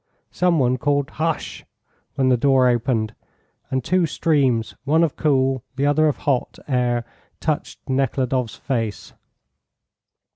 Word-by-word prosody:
Some 180 -1 +2
one 130 -2 +2
called 145 +2 0
"Hush!" 160 0 -3 0.5
when 135 -2 +2
the 125 - +5
door 130 +1 +4
opened, 115 -3 0 0.6
and 130 0 -1
two 180 -2 +2
streams, 135 -8 +1
one 155 +4 +3
of 160 - 0
cool, 135 -4 +1
the 135 +2 0
other 150 +2 +3
of 150 - 0
hot, 135 -4 0
air 120 -3 0 0.3
touched 155 -2 -3
Nekhludoff's 130 -2 0
face. 115 -6 -3
135 Hz, 125 wpm, -22 LUFS, 125-150 Hz, 0.6 s, the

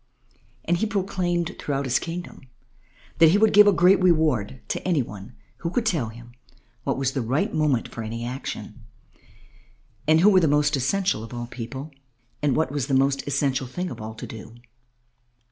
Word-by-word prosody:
And 175 +1 +2
he 220 - 0
proclaimed 185 -4 -1
throughout 140 -1 -2
his 130 -1 +2
kingdom 170 +1 -7 0.8
that 165 -1 +8
he 185 - +4
would 220 +1 +4
give 210 0 +8
a - - +7
great 185 +1 +4
reward 155 - +2
to - - -2
any 170 -7 +1
one 105 +2 -11 0.2
who 170 - -3
could 225 +6 -1
tell 155 - 0
him 120 +1 -13 0.5
what - - -1
was 135 -1 0
the 135 - -2
right 125 +6 -1
moment 150 -6 +1
for 115 - -8
any 115 +1 -5
action, 125 -1 -6 1.2
and 160 +1 +5
who 200 - +7
were 190 - +6
the 165 - +2
most 145 +1 +2
essential 160 - 0
of 115 +2 -9
all 120 0 -4
people, 130 +5 -7 0.5
and 145 -4 +1
what 160 -4 0
was 140 -3 -2
the 135 - +1
most 135 +1 +1
essential 135 -2 0
thing 180 +8 -4
of - - -8
all 110 +1 -7
to - - -7
do. 115 +1 -10
145 Hz, 185 wpm, -24 LUFS, 125-175 Hz, 1.2 s, that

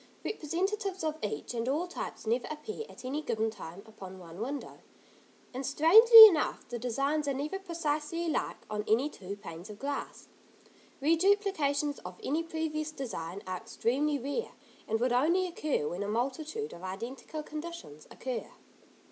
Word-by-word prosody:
Representatives 385 +2 -2
of 310 0 -2
each 205 0 -3
and 235 +1 -2
all 305 +6 0
types 355 - -6
never 235 +3 0
appear 425 +9 -6
at - - -12
any 280 +4 -2
given 220 -6 -1
time 195 -2 -9
upon 190 -4 -10
one 175 +1 -10
window; 275 +4 -5 0.7
and 260 +2 -4
strangely 440 - +10
enough 340 -8 +2
the 240 0 -4
designs 275 +5 0
are 280 - 0
never 300 +8 -3
precisely 335 -2 -2
alike 320 - -1
on 210 0 -3
any 255 +8 +2
two 195 +1 -7
panes 185 -2 -9
of 210 - -9
glass. 280 +4 -5 0.8
Reduplications 320 -4 +2
of - - -9
any 305 +4 0
previous 320 -2 -3
design 200 - -6
are 185 0 -3
extremely 265 +7 0
rare, 285 - -3 0.3
and 220 +1 0
would 245 +1 +1
only 335 +9 +3
occur 305 - -1
when 175 +5 -4
a 205 - -2
multitude 275 - -2
of 170 - -11
identical 235 +11 -6
conditions 305 - -8
occur. 255 -3 -5
285 Hz, 155 wpm, -31 LUFS, 225-325 Hz, 0.8 s, strangely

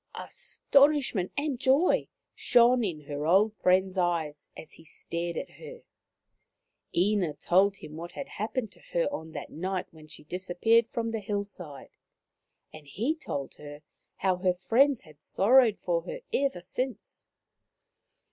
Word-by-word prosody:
Astonishment 275 -9 +1
and 285 -3 -1
joy 275 +6 +3 0.3
shone 245 0 +4
in 170 -7 -3
her 145 +1 -4
old 200 +5 +4
friend's 185 +1 +2
eyes 165 -4 -1
as 160 - -10
he - - -15
stared 170 +1 -5
at - - -5
her. 480 0 -10 1.1
Ina 185 -4 +2
told 195 +6 +3
him 155 -5 -10
what 170 +1 -8
had 275 - -6
happened 220 +1 -3
to - - -19
her 170 - +2
on 160 0 -6
that - - -7
night 185 +2 -3
when 155 -1 -15
she 150 - -11
disappeared 185 +7 +1
from 230 -1 -2
the 225 - -2
hillside, 200 -8 -5 0.8
and 155 -2 -12
he 225 - -1
told 140 - -5
her 145 0 -10 0.3
how 185 -1 +1
her 180 0 +1
friends 255 +8 +3
had 155 -4 -18
sorrowed 230 +4 +4
for - - -1
her - - -7
ever 270 -11 0
since. 255 +8 -5
190 Hz, 145 wpm, -28 LUFS, 170-245 Hz, 1.1 s, shone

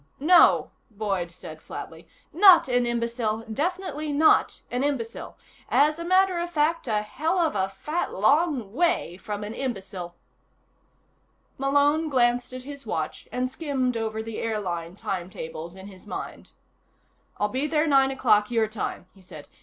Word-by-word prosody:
"No," 335 +5 +5 0.2
Boyd 200 -5 -2
said 170 - -11
flatly. - - -9 0.3
"Not 360 -2 +7
an 245 -1 +1
imbecile. 235 -2 -2
Definitely 310 - -3
not 300 +2 +3
an 245 +2 -1
imbecile. 260 -5 -3 0.3
As 300 +3 +3
a - - -4
matter 370 0 +3
of 345 0 -3
fact, 325 -1 0
a 210 -2 0
hell 315 - -2
of 330 -3 +2
a 190 -1 0
fat 300 - -3
long 270 - +1
way 335 - 0
from 210 +1 -5
an 210 +1 -5
imbecile." 190 -9 -5 1.4
Malone 285 +3 +2
glanced 245 -2 +2
at 255 0 -7
his 280 0 -9
watch - - -4
and 250 0 -1
skimmed 260 -3 -2
over 220 -1 -3
the 225 -1 -6
airline 180 -6 -3
timetables 170 -3 -6
in 190 0 -11
his 195 0 -13
mind. - - -7 0.9
"I'll 210 - +1
be 265 +6 -1
there 305 0 +1
nine 270 -3 +4
o'clock, 225 -6 +2
your 225 -2 +1
time," 215 -4 -5
he 195 - -20
said. 155 -5 -12
245 Hz, 150 wpm, -25 LUFS, 210-300 Hz, 1.4 s, Not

